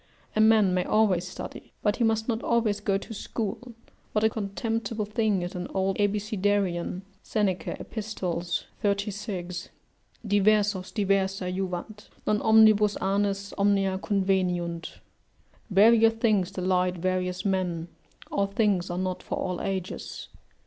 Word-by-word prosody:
A 215 - +4
man 215 -4 +5
may 180 0 +2
always 190 -5 +2
study, 180 - -8
but 210 0 +2
he 245 - +1
must 225 -1 +1
not 230 -2 -1
always 225 -3 +1
go 200 -1 +1
to 200 - -8
school 225 +3 -5 0.4
what 215 - +1
a 220 - +4
contemptible 220 +1 -2
thing 210 -3 0
is 175 - -5
an 180 -1 -4
old 190 0 +1
Abecedarian! 205 -3 0 0.2
[Seneca, 200 -4 -1
Ep. - - -10
36] 195 -1 -3 0.6
"Diversos 205 -1 +2
diversa 195 -2 0
juvant; 190 +3 -5 0.2
non 210 0 +1
omnibus 215 -2 +6
annis 200 +1 0
Omnia 195 -1 +2
conveniunt." 185 -4 -1 0.7
["Various 225 +3 +6
things 215 -5 +2
delight 185 -1 0
various 180 +1 -1
men; 180 -4 -1 0.4
all 200 0 +1
things 200 -3 +1
are 175 - -3
not 185 0 -2
for - - -4
all 180 -2 -2
ages." 190 -2 -4
200 Hz, 130 wpm, -27 LUFS, 185-215 Hz, 0.7 s, omnibus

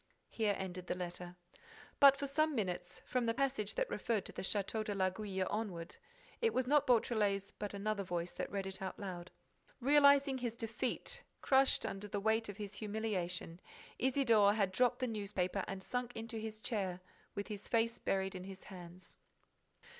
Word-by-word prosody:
Here 210 -3 +1
ended 185 -1 -5
the - - -1
letter. 180 0 -5 0.6
But, 275 -1 +9
for 280 - -2
some 305 +2 +1
minutes, 180 -5 -3
from 250 -2 0
the 230 - +1
passage 265 -6 0
that - - +1
referred 220 - -1
to - - -7
the - - -5
Château 205 +2 0
de 210 -1 -3
l'Aiguille 190 0 0
onward, 190 -6 -3 0.4
it 460 -1 +2
was 255 - +2
not 290 +2 +4
Beautrelet's 210 -5 +2
but 205 -1 -5
another 205 +1 -1
voice 175 -2 -2
that - - -4
read 195 -1 -2
it 195 0 -6
aloud. 185 -2 -5 0.5
Realizing 280 0 +6
his 240 -2 -2
defeat, 245 - -2 0.2
crushed 265 0 +4
under 195 +1 -4
the 205 0 -2
weight 220 +1 +2
of 205 - -6
his 205 -2 -5
humiliation, 205 -5 -2 0.4
Isidore 230 -6 +4
had 200 -3 +2
dropped 245 +5 +2
the 255 - +1
newspaper 200 -3 -1
and 195 -1 -5
sunk 245 +1 -3
into 225 +1 -5
his 220 0 -6
chair, 190 -7 -1 0.4
with 200 +2 -4
his 210 -1 -6
face 230 0 +1
buried 190 0 0
in 185 -1 -6
his 195 -1 -8
hands. 180 -1 -10
210 Hz, 170 wpm, -36 LUFS, 190-240 Hz, 0.6 s, But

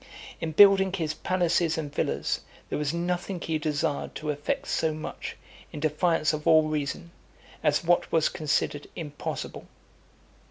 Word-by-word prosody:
In 160 -1 -3
building 195 +1 +7
his 160 -5 -1
palaces 175 -1 +1
and 150 -3 -4
villas, - - -1 0.3
there - - -2
was 150 -1 0
nothing 175 +2 -2
he 160 -2 -2
desired 145 -2 -1
to 155 -1 -2
effect 145 0 -2
so 160 -1 0
much, 155 - -6 0.3
in - - -6
defiance 155 +1 +2
of 150 +1 -4
all 160 -1 +7
reason, 155 +2 -3 0.5
as - - +2
what 175 +1 +2
was 160 -2 +3
considered 145 -1 -1
impossible. 150 -4 -5
160 Hz, 145 wpm, -27 LUFS, 150-170 Hz, 0.5 s, building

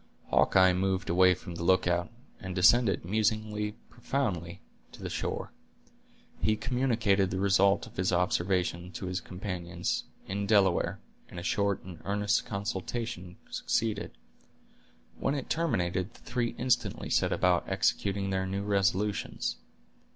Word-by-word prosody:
Hawkeye 95 -1 +5
moved 95 0 0
away 90 +1 +5
from 90 0 -9
the 85 0 -5
lookout, 90 -1 +2 0.3
and 95 -2 -6
descended, 100 +2 +4
musing 105 +1 0
profoundly, 115 - -3 0.3
to - - -12
the - - -4
shore. - - -3 0.9
He 110 - +3
communicated 115 -5 +1
the 95 - -2
result 100 0 +3
of - - -15
his 90 0 +1
observations 90 -1 0
to - - -6
his 90 +1 -2
companions, 90 -2 -3 0.2
in 100 +1 -3
Delaware, 100 -4 +3 0.3
and 85 - -7
a - - -7
short 100 +1 0
and 90 -3 -10
earnest 100 0 0
consultation 100 -1 -4 0.2
succeeded. 110 -2 -1 1.0
When 140 - 0
it 140 - -4
terminated, 95 - 0
the - - -17
three 120 -1 -2
instantly 125 0 0
set - - +2
about - - +2
executing 100 -1 0
their 95 0 0
new 100 +1 -2
resolutions. 100 0 0
95 Hz, 130 wpm, -30 LUFS, 90-110 Hz, 1.0 s, Hawkeye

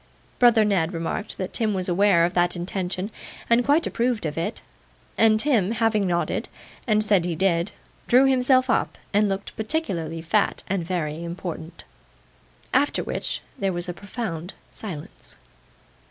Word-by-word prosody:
Brother 235 -3 +6
Ned 185 -4 +1
remarked 165 +5 -3
that 185 -1 -4
Tim 220 -4 +1
was 185 -1 -2
aware 180 -1 +4
of 175 - -2
that 175 0 +2
intention, 185 +2 -3 0.4
and 235 +1 +4
quite 295 +6 +3
approved 235 -5 0
of 150 - -2
it; 185 +7 -3 0.5
and 220 -1 +4
Tim 225 -9 +2
having 220 -3 +1
nodded, 175 -1 -1 0.4
and 215 -1 +3
said 205 -4 +3
he 175 -1 -2
did, 170 +1 +1 0.4
drew 255 +3 +6
himself 260 0 +4
up 250 - 0 0.2
and 205 0 +3
looked 195 0 -4
particularly 180 - -3
fat, 200 +5 +1
and 195 -3 -1
very 165 -2 -3
important. 170 -1 -6 0.9
After - - +2
which, - - -3 0.2
there 195 -1 0
was 175 0 -2
a 175 - -3
profound 185 -3 -5 0.2
silence. 180 -4 -9
195 Hz, 150 wpm, -24 LUFS, 175-220 Hz, 0.9 s, Brother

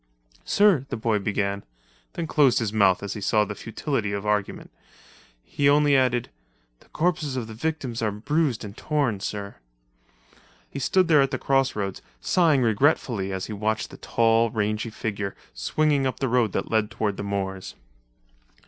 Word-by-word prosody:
"Sir," 195 -10 +3
the 130 - -3
boy 110 -1 0
began, 100 0 -2 0.5
then 170 - -3
closed 140 -6 +3
his 110 -3 -1
mouth 100 -3 +3
as 100 - -3
he 105 - -7
saw 105 +2 +2
the 105 - -5
futility 115 0 -3
of 100 +1 -4
argument. 105 -1 -2 0.7
He 140 - +1
only 145 0 +4
added, 125 -2 +1 0.5
"The - - -24
corpses 155 -4 -1
of 125 -3 -2
the 110 - -9
victims 130 -2 -3
are 110 - +1
bruised 125 +5 -1
and 100 -1 -8
torn, 140 -10 -1
sir." 100 0 -5 1.1
He - - -7
stood 185 +7 +2
there 155 -4 +5
at 135 - +2
the 130 - -2
crossroads, 130 -8 0 0.2
sighing 155 - +3
regretfully 115 -4 +1
as 95 -1 -3
he 110 - -6
watched 110 0 -2
the - - -11
tall, 115 0 +2
rangy 110 +1 -1
figure 105 -2 -4 0.2
swinging 150 -3 +1
up 130 - -4
the 135 - 0
road 120 -4 +2
that - - -3
led 110 -2 +2
toward 105 -2 -2
the - - -5
moors. 95 -1 -4
115 Hz, 165 wpm, -25 LUFS, 105-140 Hz, 1.1 s, there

